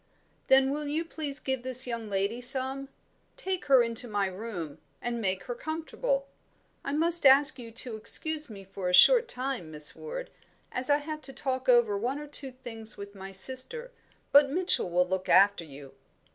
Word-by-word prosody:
"Then 265 0 +5
will 295 +1 -3
you 310 +3 -1
please 300 -3 -5
give 265 -2 -2
this 255 0 -1
young 230 -3 -5
lady 200 +4 -1
some: 265 +2 -1 0.5
take 380 -7 -3
her 265 -3 +6
into 230 +1 0
my 205 -3 0
room, 185 -6 -6 0.2
and 235 -1 -3
make 190 -3 -1
her 245 - -4
comfortable. 330 - -3 0.6
I - - -3
must 335 +3 +1
ask 280 +1 +6
you 235 -2 -8
to 235 0 -3
excuse 310 +6 -3
me 200 -3 -10
for 190 -1 -5
a 180 - +5
short 485 - +7
time, 250 -9 -4
Miss 150 -1 0
Ward, - - -7 0.4
as 250 +3 -2
I 290 - +5
have 305 +1 -6
to 270 - -7
talk 260 -1 -3
over 240 -4 +5
one 250 +6 -2
or 295 - -7
two 285 -2 +2
things 225 -4 -9
with 200 0 -9
my 195 -1 -9
sister; 260 - -3 0.4
but 285 0 +7
Mitchell 350 - 0
will 180 +1 +2
look 185 0 -3
after 195 0 +5
you." 140 -3 -12
255 Hz, 185 wpm, -29 LUFS, 200-290 Hz, 0.6 s, short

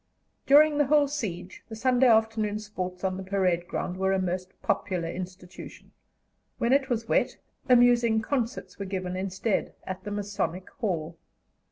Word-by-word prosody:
During 295 +1 +6
the 290 - +3
whole 295 0 +4
siege 190 -10 -5
the 220 - -6
Sunday 250 +2 +3
afternoon 220 -2 +2
sports 185 -4 -6
on 185 -1 -1
the 190 - -5
parade 185 -3 0
ground 180 - -3
were 190 0 +1
a - - +2
most 185 0 -4
popular 180 -4 -1
institution; 180 +1 -9 0.7
when 235 +2 +2
it 275 0 +2
was 230 -2 -1
wet, - - +1 0.3
amusing 240 -2 +5
concerts 235 -1 -3
were 200 - -3
given 185 -1 -3
instead 190 +3 -2
at 185 0 -6
the - - -5
Masonic 205 -3 -3
Hall. 170 - -3
200 Hz, 155 wpm, -27 LUFS, 185-235 Hz, 0.7 s, During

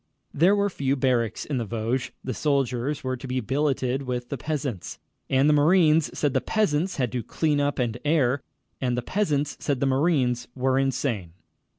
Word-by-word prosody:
There 180 +7 +4
were 200 0 +1
few 135 -4 0
barracks 125 -4 0
in 140 -4 -2
the - - -1
Vosges. 115 +3 -2
The 130 - -3
soldiers 135 0 0
were 130 0 -1
to 130 +2 -8
be 130 0 -1
billeted 135 +1 0
with 125 -2 -4
the 140 - -3
peasants. 140 - -4 0.3
And 135 +1 +3
the 150 - +5
marines 155 0 +4
said 145 -3 +1
the 130 - +2
peasants 185 -4 0
had 125 -4 -1
to 125 - -2
clean 150 +4 0
up 145 0 0
and 120 -2 -1
air, 145 -4 +2 0.4
and 125 -2 0
the 125 - -2
peasants 150 -4 -1
said 140 -4 -1
the 140 - +1
marines 130 -3 +1
were 130 0 +1
insane. 125 - -1
135 Hz, 185 wpm, -25 LUFS, 125-150 Hz, 0.4 s, the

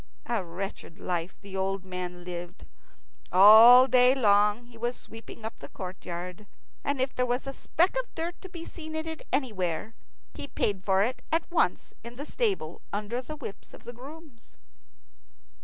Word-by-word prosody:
A 235 -5 -1
wretched 180 0 -7
life 175 -2 -3
the 195 -1 -9
old 190 0 -2
man 180 -1 -6
lived. 175 +1 -7 0.7
All 220 +6 +10
day 250 0 +6
long 210 -1 +3
he 240 -1 -17
was 240 +2 -2
sweeping 225 0 -10
up 225 - -6
the - - -10
courtyard, 180 +1 -7 0.4
and 285 -1 -1
if 260 +1 0
there 250 - 0
was 245 +1 -1
a 270 - -5
speck 350 - +1
of - - -4
dirt 335 +1 -2
to 375 - -9
be 335 -2 -8
seen 315 -2 -7
in 315 0 -2
it 320 -1 -6
anywhere, 210 - -1 0.4
he 285 - -6
paid 200 -8 -1
for 195 0 +3
it 245 +4 -2
at 325 +1 +2
once 340 - +1
in 235 +1 -9
the 285 +4 -6
stable 390 - -1
under 210 +4 -3
the 305 +4 -7
whips 275 -9 -9
of - - -17
the 240 - -8
grooms. 280 +1 -13
230 Hz, 175 wpm, -28 LUFS, 190-275 Hz, 0.7 s, All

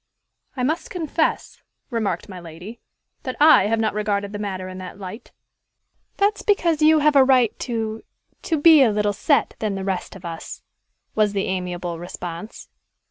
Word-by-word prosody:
"I 250 - -1
must 310 +6 -1
confess," 325 -2 -2 0.3
remarked 225 -4 -2
my 185 -3 -9
lady, 175 +7 -10 0.4
"that 255 - -5
I 295 -9 +7
have 225 +1 +1
not 220 -1 0
regarded 205 -1 -2
the 205 - -5
matter 190 -3 -4
in 185 0 -8
that 185 0 -8
light." 200 +3 -9 0.9
"That 410 +1 +2
is - - -8
because 335 -6 +1
you 310 +1 +6
have 300 0 +3
a - - +8
better 265 - +6
right 255 -4 +3
to 225 -2 -3 0.4
to 325 - -1
be 315 -1 +7
a 255 - +5
little 210 -1 0
set 280 +8 +1
than 210 -3 -2
the 190 0 -4
rest 190 -1 -3
of 190 -1 -12
us," 165 -1 -7 0.5
was 210 -2 +2
the 195 -1 -1
amiable 180 -2 -3
response. 175 +3 -8
210 Hz, 180 wpm, -22 LUFS, 185-270 Hz, 0.9 s, a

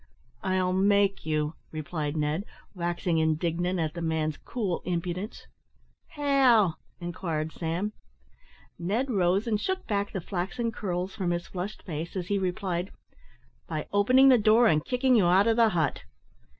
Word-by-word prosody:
"I'll 185 -1 +1
make 200 -1 +2
you," 155 0 0 0.2
replied 155 -1 -3
Ned, 150 +4 0 0.3
waxing 175 -2 -1
indignant 165 +3 0
at 155 -2 -1
the 170 - -6
man's 160 -2 -1
cool 205 -8 -3
impudence. 180 +4 -4 0.6
"How?" 265 - +3 0.2
inquired 165 -3 -3
Sam. 175 +7 -3 0.9
Ned 220 +10 -1
rose 190 0 +2
and 215 -3 0
shook 380 0 -2
back 200 -1 -1
the 190 - -3
flaxen 195 +6 -3
curls 185 -3 -3
from 185 -4 -2
his 175 0 -1
flushed 190 +3 -6
face, 165 0 -5
as 180 -2 -4
he 200 -1 +1
replied, 185 -1 -2 0.8
"By 155 -2 -3
opening 255 +7 +6
the 250 -2 +6
door 220 +3 +5
and 155 -7 +3
kicking 255 +5 +1
you 200 -6 +4
out 185 +3 +5
of 225 -1 +3
the 230 -1 +5
hut." 160 -8 0
185 Hz, 150 wpm, -28 LUFS, 165-210 Hz, 0.9 s, opening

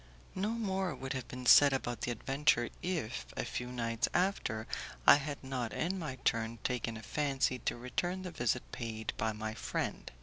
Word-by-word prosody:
No 195 +3 -1
more 195 -5 -1
would 135 +2 -4
have 130 -3 -4
been 125 0 -7
said 140 +3 +8
about 120 -2 -2
the - - -1
adventure 135 0 +2
if, 130 - -2
a - - -1
few 125 - -3
nights 115 -2 -1
after, 175 - +1 0.4
I - - +10
had 145 0 -5
not 130 -4 -3
in 185 +3 -1
my 150 -6 -4
turn 115 0 +1
taken 115 -2 -1
a 110 - -10
fancy 135 0 0
to - - -2
return 175 +10 -2
the 180 - -5
visit 120 -4 0
paid 110 -2 -4
by 110 +1 +1
my 110 0 -4
friend. - - -3
125 Hz, 180 wpm, -33 LUFS, 115-155 Hz, 0.4 s, I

